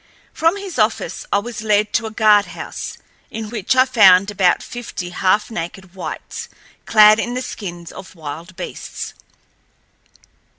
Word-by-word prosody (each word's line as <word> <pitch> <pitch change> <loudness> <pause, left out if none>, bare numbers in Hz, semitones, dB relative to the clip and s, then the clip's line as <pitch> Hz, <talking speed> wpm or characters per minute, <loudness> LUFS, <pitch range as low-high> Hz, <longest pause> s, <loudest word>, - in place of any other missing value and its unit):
From 330 +5 +2
his 390 -9 -6
office 215 -5 0
I - - +4
was 210 +1 -4
led 210 -1 +1
to 225 - +1
a - - -5
guardhouse, 215 -2 +1 0.3
in 220 -1 -6
which 220 +2 0
I 255 0 +6
found 200 -5 +6
about 185 -3 +2
fifty 230 -7 -6
half 190 +5 +1
naked 180 0 -6
whites, 185 - -7 0.4
clad 215 0 +7
in 240 +2 -2
the 255 - -2
skins 175 -7 -7
of 190 -1 -11
wild 165 +3 -8
beasts. 180 - -7
210 Hz, 140 wpm, -19 LUFS, 185-225 Hz, 0.4 s, clad